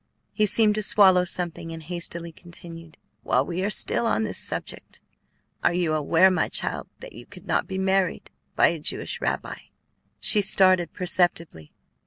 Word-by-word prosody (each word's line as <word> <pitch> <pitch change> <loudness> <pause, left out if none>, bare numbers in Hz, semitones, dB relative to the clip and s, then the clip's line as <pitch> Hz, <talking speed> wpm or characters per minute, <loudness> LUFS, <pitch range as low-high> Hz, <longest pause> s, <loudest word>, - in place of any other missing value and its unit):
He 215 -1 +1
seemed 215 +1 +4
to 215 - -2
swallow 190 -3 +4
something, 175 -2 -4
and 165 0 -9
hastily 170 0 -5
continued: 165 -1 -12 0.2
"While 125 +3 0
we 180 +3 -4
are 200 - 0
still 230 +2 0
on 225 - 0
this 215 - -4
subject, - - -5 0.6
are 175 - +2
you 175 -3 0
aware, 165 +5 +3
my 180 -3 0
child, - - -1
that - - -11
you 120 +2 -13
could 185 -2 -15
not 170 - -1
be 190 - -5
married 190 -1 -1 0.2
by - - +4
a - - -4
Jewish - - -2
rabbi?" - - -3 0.6
She 210 - +5
started 185 -2 +3
perceptibly. 170 - -1
180 Hz, 165 wpm, -24 LUFS, 165-190 Hz, 0.6 s, She